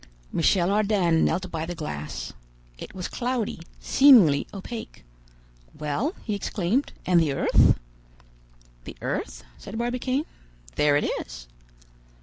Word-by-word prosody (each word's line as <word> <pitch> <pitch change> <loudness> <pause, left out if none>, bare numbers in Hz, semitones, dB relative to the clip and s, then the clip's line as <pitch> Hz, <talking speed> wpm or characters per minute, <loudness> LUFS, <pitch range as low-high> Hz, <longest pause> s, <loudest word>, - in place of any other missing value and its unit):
Michel 175 +2 +2
Ardan 200 -6 +2
knelt 180 +2 0
by 160 -1 -3
the 175 +2 -5
glass. 75 - -6 0.5
It - - -9
was 180 -2 -4
cloudy, 245 -6 -2 0.2
seemingly 220 - +6
opaque. 215 - -8 0.7
"Well!" 215 - -2
he 215 - -3
exclaimed, 205 +5 -1
"and 180 -1 +4
the 150 -4 +1
earth?" - - +4 1.1
"The - - -8
earth?" - - -3 0.2
said 210 - -8
Barbicane. 250 +4 -1 0.5
"There 145 -1 +3
it - - 0
is." - - -4
185 Hz, 120 wpm, -25 LUFS, 160-235 Hz, 1.1 s, seemingly